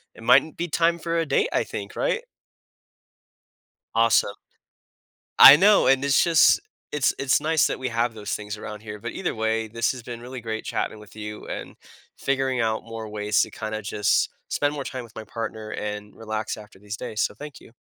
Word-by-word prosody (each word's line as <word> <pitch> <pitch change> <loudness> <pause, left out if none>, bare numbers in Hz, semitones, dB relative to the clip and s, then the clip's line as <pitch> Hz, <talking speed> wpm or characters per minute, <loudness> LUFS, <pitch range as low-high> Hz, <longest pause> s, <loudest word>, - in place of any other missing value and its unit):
it - - -14
mightn't 140 +6 +4
be 175 +1 -2
time 170 +1 +1
for 170 0 -2
a 165 - +1
date, 140 - +1
I - - +2
think. - - -7
Right? 475 - 0 1.7
Awesome. 115 -3 +3 1.0
I 140 - +12
know. 205 +5 +5
And 135 +1 +4
it's 140 -1 +4
just 165 -3 +5 0.3
it's 150 -3 +2
it's 135 0 +2
nice 155 -1 +2
that - - -2
we 130 -1 -2
have 115 0 0
those 105 -2 -7
things 105 0 -4
around 105 0 -8
here, 105 -1 -8
but 120 +3 -6
either 190 - -3
way, 110 0 -1
this 115 +2 0
has 125 - -9
been 120 0 -8
really 125 +1 -8
great 110 -1 -5
chatting 110 - -3
with 105 0 -15
you 105 0 -7
and - - -7 0.4
figuring 135 -2 0
out 110 -1 0
more 115 -1 -7
ways 105 0 +1
to - - -3
kinda 110 0 -5
just 105 0 +1 0.2
spend 145 0 0
more 140 -2 -5
time 130 -2 -5
with 115 - -16
my 110 - -6
partner 110 -1 -6
and 105 0 -5
relax 110 -1 -4
after 105 -2 -14
these 105 +1 -7
days. 110 -2 -5
So, - - -1
thank 145 +4 -10
you. - - -17
115 Hz, 200 wpm, -24 LUFS, 110-135 Hz, 1.7 s, I